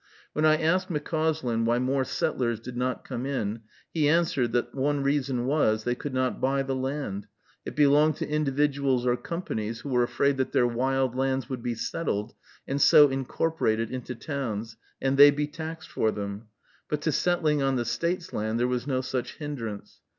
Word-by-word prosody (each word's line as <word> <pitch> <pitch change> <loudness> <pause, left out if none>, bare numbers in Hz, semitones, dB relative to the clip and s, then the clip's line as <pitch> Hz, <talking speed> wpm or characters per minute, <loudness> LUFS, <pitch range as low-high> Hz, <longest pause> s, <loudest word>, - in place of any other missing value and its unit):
When 155 - +1
I 155 0 +5
asked 180 +4 +1
McCauslin 155 -6 -1
why 120 +1 +2
more 130 +2 +1
settlers 120 -2 -1
did 120 +1 -8
not 125 +1 -2
come 125 -2 -4
in, 115 -5 -2 0.3
he 150 -3 +2
answered, 150 -7 +2
that 120 - 0
one 140 +1 0
reason 135 -3 0
was, 120 -6 +2
they 120 - 0
could 140 +3 -5
not 130 0 -1
buy 135 +1 +1
the 135 0 -2
land, 130 -7 -3 0.4
it - - -6
belonged 150 +1 +4
to - - -4
individuals 140 -3 +1
or 120 -1 +3
companies 115 - -4
who 140 - -6
were 125 -2 +2
afraid 140 +3 +1
that 130 - -1
their 125 - +4
wild 130 +1 0
lands 130 -1 0
would 130 -3 -4
be 120 0 -2
settled, 115 -3 -2 0.3
and 140 +1 -1
so 145 +1 +8
incorporated 135 -4 -1
into 130 0 -5
towns, 115 -5 -4 0.2
and 135 0 0
they 145 +1 +10
be 145 +1 0
taxed 160 +2 -7
for 110 - +1
them; 100 +1 -5 0.4
but 150 -1 -1
to 155 - +1
settling 155 -2 +1
on 135 -1 +1
the 120 -2 -1
State's 170 - -2
land 110 +2 -1
there 120 - +2
was 125 +1 -2
no 130 -2 0
such 130 -1 -3
hindrance. 120 -9 -6
135 Hz, 185 wpm, -27 LUFS, 120-145 Hz, 0.4 s, they